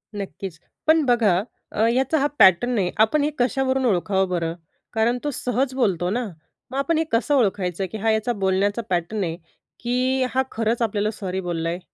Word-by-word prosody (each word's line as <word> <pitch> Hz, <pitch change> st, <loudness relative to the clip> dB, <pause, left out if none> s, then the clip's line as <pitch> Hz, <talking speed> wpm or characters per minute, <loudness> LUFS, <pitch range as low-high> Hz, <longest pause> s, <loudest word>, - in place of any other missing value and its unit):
नक्कीचं. 195 Hz, -3 st, -6 dB, 0.3 s
पण 315 Hz, -1 st, +5 dB
बघा, 230 Hz, -8 st, +3 dB, 0.3 s
अ, 220 Hz, -, +1 dB
याचा 265 Hz, +5 st, +1 dB
हा 285 Hz, -, +2 dB
पॅटर्न 230 Hz, +6 st, +5 dB
आहे. 180 Hz, -3 st, +1 dB
आपण 285 Hz, +7 st, +4 dB
हे 300 Hz, -, +2 dB
कशावरून 260 Hz, +1 st, +1 dB
ओळखावं 190 Hz, -2 st, +1 dB
बरं? 165 Hz, -2 st, -1 dB, 0.4 s
कारण 230 Hz, +2 st, +2 dB
तो 295 Hz, -, -1 dB
सहज 255 Hz, +1 st, -1 dB
बोलतो 185 Hz, -9 st, +1 dB
ना. 245 Hz, +4 st, -1 dB, 0.5 s
मग 270 Hz, -, -4 dB
आपण 315 Hz, +4 st, +1 dB
हे 320 Hz, -, +2 dB
कसं 255 Hz, +6 st, +2 dB
ओळखायचं? 195 Hz, -6 st, 0 dB
की -, -, -4 dB
हा 220 Hz, +1 st, +1 dB
याचा 220 Hz, +2 st, 0 dB
बोलण्याचा 200 Hz, +4 st, +1 dB
पॅटर्न 185 Hz, +4 st, -1 dB
आहे, 165 Hz, -1 st, -3 dB, 0.4 s
की 255 Hz, +2 st, 0 dB
हा 265 Hz, -, +3 dB
खरंच 225 Hz, +1 st, -1 dB
आपल्याला 215 Hz, -1 st, 0 dB
सॉरी 190 Hz, -3 st, -4 dB
बोलला 165 Hz, -2 st, -2 dB
आहे. 175 Hz, +2 st, -3 dB
220 Hz, 180 wpm, -23 LUFS, 190-255 Hz, 0.5 s, पण